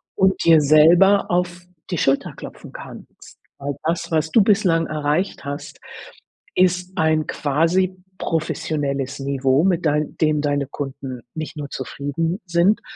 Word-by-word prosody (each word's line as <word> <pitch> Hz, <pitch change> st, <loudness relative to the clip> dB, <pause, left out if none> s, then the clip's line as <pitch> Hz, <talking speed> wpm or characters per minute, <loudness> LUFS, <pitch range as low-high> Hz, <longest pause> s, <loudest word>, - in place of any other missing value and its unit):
und 190 Hz, 0 st, +2 dB
dir 165 Hz, -1 st, +6 dB
selber 170 Hz, +7 st, +5 dB
auf 180 Hz, 0 st, -1 dB, 0.3 s
die 180 Hz, -, -2 dB
Schulter 135 Hz, -1 st, +1 dB
klopfen -, -, -10 dB
kannst. -, -, -12 dB, 0.2 s
All 140 Hz, 0 st, -4 dB
das, 170 Hz, +1 st, -2 dB
was 160 Hz, 0 st, 0 dB
du 225 Hz, -, +5 dB
bislang 195 Hz, -5 st, +2 dB
erreicht 155 Hz, +5 st, -2 dB
hast, 140 Hz, +1 st, -7 dB, 0.8 s
ist 180 Hz, 0 st, +2 dB
ein 155 Hz, -1 st, +1 dB
quasi 165 Hz, +6 st, +1 dB, 0.2 s
professionelles 140 Hz, -4 st, -2 dB
Niveau, 135 Hz, +1 st, +1 dB
mit 180 Hz, -3 st, +1 dB
dein 150 Hz, 0 st, 0 dB
dem 155 Hz, -1 st, +1 dB
deine 145 Hz, -1 st, -1 dB
Kunden 135 Hz, -2 st, -6 dB
nicht 155 Hz, -1 st, -6 dB
nur 145 Hz, -2 st, -6 dB
zufrieden 145 Hz, +7 st, -3 dB
sind, 175 Hz, +4 st, +2 dB
160 Hz, 135 wpm, -21 LUFS, 145-175 Hz, 0.8 s, dir